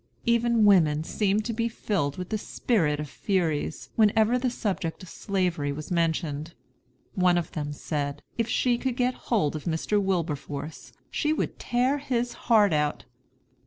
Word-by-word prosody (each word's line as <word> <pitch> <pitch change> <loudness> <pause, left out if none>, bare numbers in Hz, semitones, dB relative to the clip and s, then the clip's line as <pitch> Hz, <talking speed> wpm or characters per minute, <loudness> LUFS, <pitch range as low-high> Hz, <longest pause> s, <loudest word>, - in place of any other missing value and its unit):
Even 235 -1 +3
women 160 -7 +5
seemed 205 +4 0
to 230 - -2
be 230 +1 0
filled 175 -11 -2
with 180 -1 -5
the 220 - 0
spirit 165 -11 0
of 150 - -4
Furies, 165 -3 -1
whenever 220 +2 +4
the 255 0 +1
subject 190 -7 -3
of 180 - -10
Slavery 180 -7 -1
was 150 +3 -7
mentioned. 165 -2 -1 0.6
One 180 -3 +3
of 175 - -2
them 145 -2 -4
said, 145 -1 -3
if 230 -1 0
she 240 +1 +2
could 260 -2 -1
get 250 0 +2 0.2
hold 195 - +2
of 155 - -6
Mr. 175 +5 0
Wilberforce 155 -5 -3 0.2
she 305 0 +1
would - - -3
tear 255 +4 +1
his 245 -3 -1 0.2
heart 210 -6 +5
out. 150 -1 0
190 Hz, 160 wpm, -27 LUFS, 155-230 Hz, 0.6 s, women